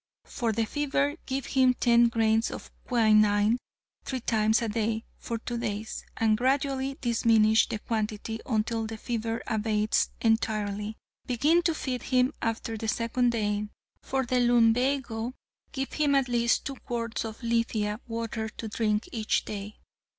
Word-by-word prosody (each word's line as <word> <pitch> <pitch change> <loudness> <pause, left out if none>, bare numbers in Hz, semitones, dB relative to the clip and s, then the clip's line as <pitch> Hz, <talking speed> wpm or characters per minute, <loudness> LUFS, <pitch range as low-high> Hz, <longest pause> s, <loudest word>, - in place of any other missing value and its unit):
For 235 -4 -2
the 225 +1 0
fever, 290 +2 0
give 270 0 -2
him 255 -1 +3
ten 235 -1 +5
grains 225 0 +2
of - - -8 0.2
quinine 215 -1 +4 0.4
three 260 -2 -4
times 220 0 +2
a - - 0
day 220 +1 -1
for 230 - -3
two 235 +1 -4
days 220 -2 -4
and 220 -1 +3
gradually 270 +1 0
diminish 225 -2 +3
the - - -2
quantity 220 0 -3
until 225 -1 0
the 225 0 -6
fever 225 0 -3
abates 215 -1 +1
entirely. 215 -2 0 0.3
Begin 295 +8 +3
to 335 -2 +1
feed 255 -4 -3
him 255 +2 +2
after 225 0 -2
the 225 - -4
second 235 +2 +1
day. 210 -2 -1 0.3
For 265 -1 -1
the 250 +1 +1
lumbago, 245 0 +2 0.4
give 270 -1 -4
him 290 -2 +2
at 270 -2 +3
least 235 -1 +1
two 275 -2 -4
quarts 235 -1 -3
of 225 +2 -7
lithia 230 -2 0
water 225 -1 -3
to 225 - -7
drink 215 0 0
each 220 -3 0
day. 205 0 -6
230 Hz, 150 wpm, -28 LUFS, 220-250 Hz, 0.4 s, ten